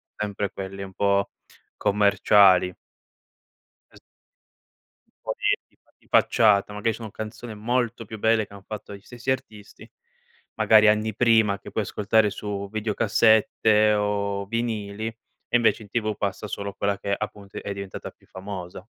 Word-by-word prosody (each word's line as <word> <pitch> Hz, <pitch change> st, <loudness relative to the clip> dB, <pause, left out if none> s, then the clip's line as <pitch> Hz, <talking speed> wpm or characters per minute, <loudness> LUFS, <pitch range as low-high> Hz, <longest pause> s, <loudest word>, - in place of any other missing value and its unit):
sempre 105 Hz, -1 st, -3 dB
quelli 95 Hz, 0 st, -7 dB
un 95 Hz, -1 st, -10 dB
po' 100 Hz, 0 st, +1 dB, 0.5 s
commerciali. 100 Hz, -2 st, +4 dB, 1.2 s
Es -, -, -16 dB, 1.3 s
Un -, -, 0 dB
pò -, -, -33 dB
di -, -, +3 dB
di -, -, -34 dB
fa -, -, -34 dB
di -, -, -29 dB
facciata. 105 Hz, -2 st, +3 dB
Magari 105 Hz, +2 st, -1 dB
sono 110 Hz, -2 st, -8 dB
canzoni 110 Hz, +2 st, -8 dB
molto 120 Hz, +1 st, -1 dB
più 110 Hz, +1 st, -9 dB
belle 110 Hz, 0 st, +2 dB
che 100 Hz, -, -18 dB
hanno 100 Hz, -, -12 dB
fatto 105 Hz, -1 st, -7 dB
gli 100 Hz, -, -14 dB
stessi 120 Hz, +4 st, -4 dB
artisti 105 Hz, -5 st, -7 dB, 0.7 s
magari 110 Hz, -1 st, +6 dB
anni 110 Hz, +1 st, +2 dB
prima 110 Hz, -4 st, +3 dB
che -, -, -11 dB
puoi 110 Hz, -, -1 dB
ascoltare 105 Hz, +2 st, +2 dB
su 100 Hz, 0 st, -5 dB
videocassette 110 Hz, 0 st, +3 dB
o 100 Hz, -1 st, -1 dB
vinili, 110 Hz, -1 st, -3 dB
e 115 Hz, +1 st, -8 dB
invece 120 Hz, 0 st, +2 dB
in 100 Hz, -, -15 dB
TV 110 Hz, -2 st, -1 dB
passa 100 Hz, +1 st, -3 dB
solo 100 Hz, 0 st, -5 dB
quella 100 Hz, 0 st, -1 dB
che, 100 Hz, -, -4 dB
appunto, 100 Hz, -1 st, -7 dB
è 100 Hz, -, -4 dB
diventata 100 Hz, -1 st, -7 dB
più -, -, -28 dB
famosa. 95 Hz, 0 st, -8 dB
105 Hz, 150 wpm, -24 LUFS, 100-110 Hz, 1.3 s, magari